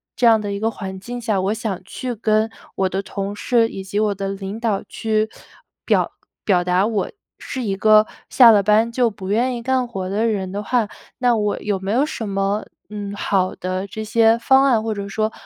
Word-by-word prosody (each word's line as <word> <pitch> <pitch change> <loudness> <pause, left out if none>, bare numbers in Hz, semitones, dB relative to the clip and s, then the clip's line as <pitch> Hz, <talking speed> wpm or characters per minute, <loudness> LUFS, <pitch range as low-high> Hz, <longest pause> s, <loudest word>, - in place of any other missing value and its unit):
这 240 - +3
样 225 -1 +6
的 205 -1 -4
一 200 - -3
个 225 +1 +1
环 190 -3 -7
境 245 +5 -6
下， 215 -5 0
我 195 +3 0
想 215 -4 -4
去 250 +4 -5
跟 220 0 +1 0.2
我 190 -1 +1
的 190 +1 -2
同 200 0 -5
事， 230 +1 +2
以 190 - -7
及 200 +2 -2
我 215 -1 +2
的 195 0 -4
领 195 +2 -5
导， 220 -4 -1
去 220 -1 0 0.6
表 - - +2 0.3
表 180 -4 +3
达 180 +2 +2
我 215 -3 -1 0.3
是 260 - -5
一 200 -3 -1
个 215 +1 +5 0.2
下 240 -3 +8
了 205 -2 +5
班 215 +3 +3
就 240 -1 +2
不 195 -2 -8
愿 245 +5 +1
意 235 - -8
干 260 0 +1
活 190 -6 -5
的 210 +4 0
人 195 -4 -2
的 205 +2 -3
话， 230 0 +1 0.3
那 245 -2 +3
我 210 -1 0
有 205 -2 -2
没 195 +1 -3
有 255 +6 +3
什 230 -7 -5
么， 195 +1 -1 0.2
嗯， 205 -1 -5
好 190 -2 0
的 185 +2 -3
这 220 +2 -6
些 225 +1 +4
方 265 +3 +4
案， 235 -5 +3
或 225 - -1
者 200 -1 -5
说， 215 +2 -1
215 Hz, 235 characters per minute, -21 LUFS, 195-230 Hz, 0.6 s, 下